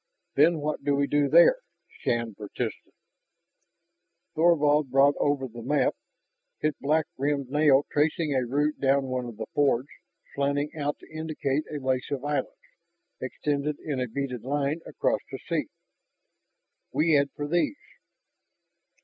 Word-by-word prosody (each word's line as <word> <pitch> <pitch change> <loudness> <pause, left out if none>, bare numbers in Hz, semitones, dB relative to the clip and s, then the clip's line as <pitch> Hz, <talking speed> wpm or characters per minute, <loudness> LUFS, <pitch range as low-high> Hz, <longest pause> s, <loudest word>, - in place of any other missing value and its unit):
"Then 160 +4 +4
what 150 +1 -3
do 145 -1 +2
we 140 0 +2
do 145 0 +1
there?" 170 - +7 0.4
Shann 115 -2 -1
persisted. 105 0 -5 1.4
Thorvald 150 -3 +3
brought 135 +2 +5
over 145 -2 +1
the 120 0 -10
map, 135 +2 +1 0.7
his 155 - +1
black 155 +3 +2
rimmed 140 -2 -1
nail 145 -2 +4
tracing 150 0 +1
a 130 -1 +1
route 145 +5 0
down 135 0 +3
one 130 -1 -2
of 120 -3 -8
the 110 - -4
fiords, 140 -2 +2 0.4
slanting 140 +1 0
out 145 -1 -2
to - - -16
indicate 155 -2 -2
a 150 - -3
lace 130 -1 -1
of 140 -1 -3
islands 145 -3 0 0.7
extending 145 0 -2
in 145 -4 -2
a 125 - -1
beaded 125 0 -4
line 145 +3 -1
across - - 0
the - - -5
sea. - - -1 1.2
"We 165 +2 +2
head 140 -1 +4
for 145 - -4
these." 175 - +1
145 Hz, 140 wpm, -27 LUFS, 135-150 Hz, 1.4 s, there